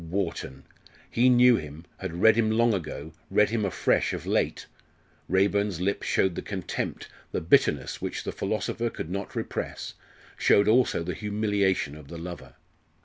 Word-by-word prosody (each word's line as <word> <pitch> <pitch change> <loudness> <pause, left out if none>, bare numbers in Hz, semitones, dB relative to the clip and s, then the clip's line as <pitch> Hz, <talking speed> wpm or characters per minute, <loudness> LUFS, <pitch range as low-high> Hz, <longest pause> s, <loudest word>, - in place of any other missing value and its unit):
Wharton! 80 -8 -3 0.5
He 125 +2 +4
knew 125 -1 +6
him 75 +2 -8
had 90 0 -4
read 110 -1 +7
him 115 -1 +2
long 115 +1 +3
ago 80 -4 -5 0.2
read 105 0 +3
him 115 -2 0
afresh 95 -4 +1
of - - -5
late. - - 0 0.6
Raeburn's 100 -1 +2
lip 100 +2 -1
showed 95 -2 +1
the - - -4
contempt, 95 -4 -4 0.2
the - - -1
bitterness 80 - +2
which - - -4
the - - -3
philosopher 110 +3 -2
could 80 - -6
not 100 +1 -4
repress, - - -4 0.4
showed 100 - +4
also 115 -6 +3
the 90 +2 -3
humiliation 100 -7 0
of 75 -2 -12
the 85 - -8
lover. 85 -7 -8
100 Hz, 155 wpm, -27 LUFS, 85-110 Hz, 0.6 s, read